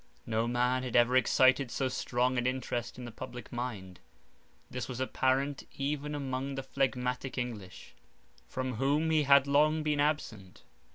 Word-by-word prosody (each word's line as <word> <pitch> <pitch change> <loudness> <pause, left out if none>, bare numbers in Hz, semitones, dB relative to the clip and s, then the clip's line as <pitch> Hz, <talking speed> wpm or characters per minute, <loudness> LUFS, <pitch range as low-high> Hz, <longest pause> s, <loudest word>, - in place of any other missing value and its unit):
No 115 0 0
man 125 +1 +1
had 130 -2 -4
ever 120 +1 +5
excited 130 +1 +4
so 135 +2 -1
strong 125 0 0
an 120 - 0
interest 125 -2 -3
in 125 - -7
the 120 - -7
public 125 0 -9
mind; 105 -7 -5 0.7
this 125 -3 -5
was 125 -1 -6
apparent 130 +2 0
even 145 +1 -2
among 135 -1 -3
the 135 - -4
phlegmatic 130 -1 -2
English, 110 -7 -6 0.5
from 130 -2 -3
whom 145 +5 +1
he 155 -1 +4
had 140 -1 +6
long 150 +2 +3
been 150 -1 0
absent. 125 -11 -2
130 Hz, 155 wpm, -31 LUFS, 120-140 Hz, 0.7 s, had